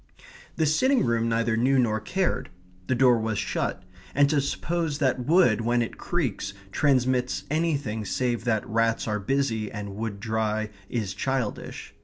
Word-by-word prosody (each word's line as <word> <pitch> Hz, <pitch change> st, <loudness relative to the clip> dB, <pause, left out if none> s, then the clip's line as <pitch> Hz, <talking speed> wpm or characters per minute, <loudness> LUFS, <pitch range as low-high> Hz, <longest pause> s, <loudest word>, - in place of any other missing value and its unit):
The 160 Hz, -, +1 dB
sitting 255 Hz, -, +3 dB
room 115 Hz, -1 st, +1 dB
neither 115 Hz, 0 st, +1 dB
knew 130 Hz, +4 st, +3 dB
nor 110 Hz, -4 st, +2 dB
cared. 180 Hz, -, -1 dB, 0.4 s
The 130 Hz, -, +1 dB
door 125 Hz, -1 st, +5 dB
was 110 Hz, -1 st, -1 dB
shut; 90 Hz, -, -2 dB, 0.3 s
and 140 Hz, +1 st, +5 dB
to 145 Hz, -2 st, +3 dB
suppose 165 Hz, +2 st, -2 dB
that 130 Hz, -4 st, +1 dB
wood, 155 Hz, -, +4 dB
when 120 Hz, +1 st, +2 dB
it 115 Hz, -, -7 dB
creaks, 120 Hz, -, -2 dB, 0.2 s
transmits 130 Hz, -2 st, +1 dB
anything 145 Hz, -9 st, 0 dB
save 120 Hz, +2 st, -1 dB
that 110 Hz, -3 st, 0 dB
rats 115 Hz, 0 st, +1 dB
are 105 Hz, -1 st, 0 dB
busy 115 Hz, -1 st, -1 dB
and 100 Hz, -1 st, -6 dB
wood 105 Hz, -1 st, -4 dB
dry 110 Hz, 0 st, -1 dB, 0.2 s
is 105 Hz, -5 st, -2 dB
childish. 130 Hz, -5 st, -3 dB
120 Hz, 155 wpm, -26 LUFS, 110-140 Hz, 0.4 s, door